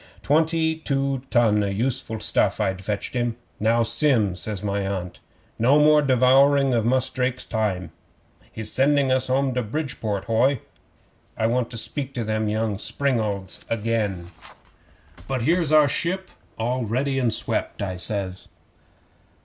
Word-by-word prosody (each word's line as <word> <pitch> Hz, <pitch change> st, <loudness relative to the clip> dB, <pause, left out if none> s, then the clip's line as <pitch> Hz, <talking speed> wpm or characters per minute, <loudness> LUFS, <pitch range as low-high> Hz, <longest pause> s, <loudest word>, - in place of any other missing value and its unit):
Twenty 160 Hz, +1 st, +2 dB
two 140 Hz, -3 st, -1 dB
ton 110 Hz, -4 st, +3 dB
o' -, -, 0 dB
useful 110 Hz, +2 st, -2 dB
stuff 105 Hz, -1 st, +1 dB
I'd 95 Hz, -2 st, -1 dB
fetched 105 Hz, +1 st, -3 dB
him. 120 Hz, -2 st, -1 dB, 0.2 s
'"Now, 115 Hz, +2 st, +2 dB
Sim," 115 Hz, -4 st, +2 dB
says 100 Hz, +2 st, -5 dB
my 100 Hz, -1 st, -1 dB
Aunt, 95 Hz, -2 st, -4 dB, 0.4 s
"no 130 Hz, +6 st, +4 dB
more 150 Hz, 0 st, +5 dB
devouring 135 Hz, +1 st, +4 dB
of 115 Hz, -1 st, +1 dB
Mus' 130 Hz, +1 st, +2 dB
Drake's 130 Hz, 0 st, -2 dB
time. 95 Hz, -6 st, -2 dB, 0.6 s
He's 110 Hz, -1 st, -5 dB
sending 140 Hz, 0 st, +2 dB
us 130 Hz, 0 st, +1 dB
home 135 Hz, +1 st, +1 dB
in -, -, -3 dB
the 125 Hz, -, 0 dB
Bridport 115 Hz, -5 st, -3 dB
hoy. 120 Hz, +4 st, +2 dB, 0.8 s
I 110 Hz, -, 0 dB
want 120 Hz, +1 st, 0 dB
to 115 Hz, -, -6 dB
speak 135 Hz, +3 st, -3 dB
to 120 Hz, -, -2 dB
them 110 Hz, 0 st, -1 dB
young 110 Hz, -1 st, -1 dB
springalds 110 Hz, -9 st, -2 dB
again." 105 Hz, -6 st, -2 dB, 1.0 s
'"But 130 Hz, -3 st, -2 dB
here's 165 Hz, +2 st, +2 dB
our 155 Hz, -1 st, +6 dB
ship 185 Hz, +7 st, -2 dB, 0.3 s
all 125 Hz, +3 st, -1 dB
ready 135 Hz, +5 st, -1 dB
and 120 Hz, -3 st, +1 dB
swept," 105 Hz, -, -2 dB
I 95 Hz, -2 st, -3 dB
says. 95 Hz, -1 st, 0 dB
120 Hz, 150 wpm, -23 LUFS, 105-135 Hz, 1.0 s, our